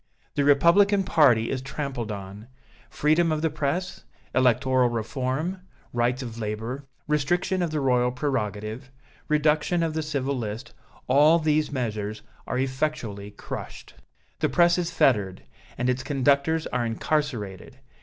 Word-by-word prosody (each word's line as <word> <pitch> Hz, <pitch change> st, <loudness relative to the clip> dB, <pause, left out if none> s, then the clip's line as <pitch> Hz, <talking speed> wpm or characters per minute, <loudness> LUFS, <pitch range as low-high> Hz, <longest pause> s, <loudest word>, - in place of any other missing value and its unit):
The 145 Hz, -, +1 dB
Republican 180 Hz, +8 st, +5 dB
party 130 Hz, -11 st, +4 dB
is 130 Hz, -, -2 dB
trampled 135 Hz, -4 st, -4 dB
on. 100 Hz, +2 st, -8 dB, 0.4 s
Freedom 160 Hz, +3 st, +2 dB
of 155 Hz, 0 st, -1 dB
the 160 Hz, -, +1 dB
press, 155 Hz, +5 st, -2 dB, 0.3 s
electoral 130 Hz, 0 st, +3 dB
reform, 130 Hz, -, -2 dB, 0.3 s
rights 120 Hz, +2 st, 0 dB
of 115 Hz, -2 st, -7 dB
labor, 115 Hz, +6 st, -4 dB, 0.2 s
restriction 175 Hz, +5 st, 0 dB
of 175 Hz, -, 0 dB
the 155 Hz, -1 st, -2 dB
Royal 125 Hz, -2 st, +2 dB
prerogative, 120 Hz, -2 st, -3 dB, 0.4 s
reduction 150 Hz, +3 st, +2 dB
of 160 Hz, -1 st, -1 dB
the 160 Hz, -, -1 dB
civil 140 Hz, -3 st, -2 dB
list, 115 Hz, 0 st, -5 dB, 0.3 s
all 150 Hz, +5 st, +5 dB
these 155 Hz, -2 st, +1 dB
measures 110 Hz, -5 st, -3 dB, 0.2 s
are -, -, -2 dB
effectually 130 Hz, -6 st, -2 dB
crushed. 105 Hz, -, -8 dB, 0.5 s
The -, -, +1 dB
press 175 Hz, 0 st, +4 dB
is 175 Hz, -1 st, -1 dB
fettered, 100 Hz, -7 st, +1 dB, 0.3 s
and 125 Hz, -, -1 dB
its 125 Hz, 0 st, 0 dB
conductors 140 Hz, +3 st, +1 dB
are 125 Hz, -, -1 dB
incarcerated. 115 Hz, -, -2 dB
135 Hz, 135 wpm, -25 LUFS, 120-155 Hz, 0.5 s, Republican